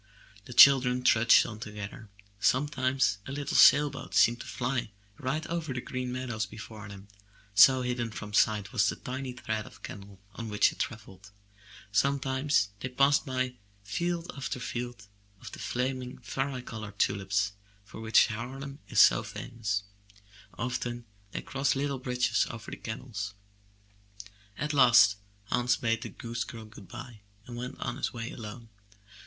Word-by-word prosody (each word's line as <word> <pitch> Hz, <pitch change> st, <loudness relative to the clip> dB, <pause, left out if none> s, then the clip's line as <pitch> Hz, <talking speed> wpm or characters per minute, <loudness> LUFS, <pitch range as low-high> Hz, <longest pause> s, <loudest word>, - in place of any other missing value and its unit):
The 125 Hz, -, -9 dB
children 125 Hz, -1 st, +7 dB
trudged 115 Hz, -1 st, +6 dB
on 110 Hz, -2 st, -7 dB
together. 105 Hz, +1 st, -8 dB, 0.3 s
Sometimes 130 Hz, -1 st, +1 dB
a -, -, -5 dB
little 145 Hz, 0 st, -3 dB
sail 145 Hz, 0 st, +7 dB
boat 135 Hz, -, -8 dB
seemed 120 Hz, +1 st, +4 dB
to -, -, -9 dB
fly 125 Hz, -2 st, -2 dB, 0.3 s
right 155 Hz, +5 st, -2 dB
over 165 Hz, -5 st, -3 dB
the -, -, -1 dB
green 125 Hz, 0 st, -4 dB
meadows 120 Hz, -4 st, -3 dB
before 110 Hz, -1 st, -10 dB
them, 100 Hz, 0 st, -11 dB, 0.5 s
so 130 Hz, +6 st, +7 dB
hidden 120 Hz, -2 st, -2 dB
from 105 Hz, -1 st, -8 dB
sight 105 Hz, -2 st, +2 dB
was 115 Hz, -, +3 dB
the -, -, -2 dB
tiny 130 Hz, 0 st, -5 dB
thread 110 Hz, -3 st, -4 dB
of -, -, -16 dB
canal 100 Hz, -1 st, -9 dB, 0.2 s
on 115 Hz, +2 st, -6 dB
which 105 Hz, 0 st, +3 dB
it -, -, -15 dB
travelled; 105 Hz, -3 st, -6 dB, 0.6 s
sometimes 135 Hz, -1 st, +1 dB
they 130 Hz, -, -4 dB
passed 140 Hz, +3 st, +3 dB
by 130 Hz, -1 st, -2 dB, 0.3 s
field 170 Hz, -, -2 dB
after 135 Hz, -1 st, -4 dB
field 120 Hz, -3 st, -5 dB, 0.3 s
of -, -, -10 dB
the -, -, -9 dB
flaming, 125 Hz, 0 st, -3 dB
vari 135 Hz, -1 st, -3 dB
colored 110 Hz, -4 st, -8 dB
tulips 100 Hz, 0 st, +1 dB, 0.3 s
for 105 Hz, +2 st, -10 dB
which 110 Hz, 0 st, +5 dB
Harlem 135 Hz, +6 st, -6 dB
is -, -, +1 dB
so -, -, +7 dB
famous; 105 Hz, -4 st, -4 dB, 0.7 s
often 120 Hz, -1 st, -3 dB, 0.3 s
they -, -, -5 dB
crossed 135 Hz, +1 st, 0 dB
little 140 Hz, -1 st, -1 dB
bridges 125 Hz, -2 st, +1 dB
over 115 Hz, -1 st, -8 dB
the -, -, -6 dB
canals. 110 Hz, -3 st, -6 dB, 1.2 s
At 150 Hz, 0 st, -2 dB
last 120 Hz, -7 st, +6 dB, 0.3 s
Hans 125 Hz, 0 st, +2 dB
bade 115 Hz, -3 st, 0 dB
the -, -, -5 dB
goose 115 Hz, 0 st, -4 dB
girl 115 Hz, -4 st, -9 dB
good 105 Hz, -3 st, -13 dB
bye 115 Hz, -5 st, -10 dB, 0.2 s
and 120 Hz, -, -8 dB
went 125 Hz, +1 st, -6 dB
on -, -, -3 dB
his -, -, -2 dB
way 115 Hz, 0 st, -5 dB
alone. 115 Hz, 0 st, -9 dB
120 Hz, 155 wpm, -29 LUFS, 110-130 Hz, 1.2 s, children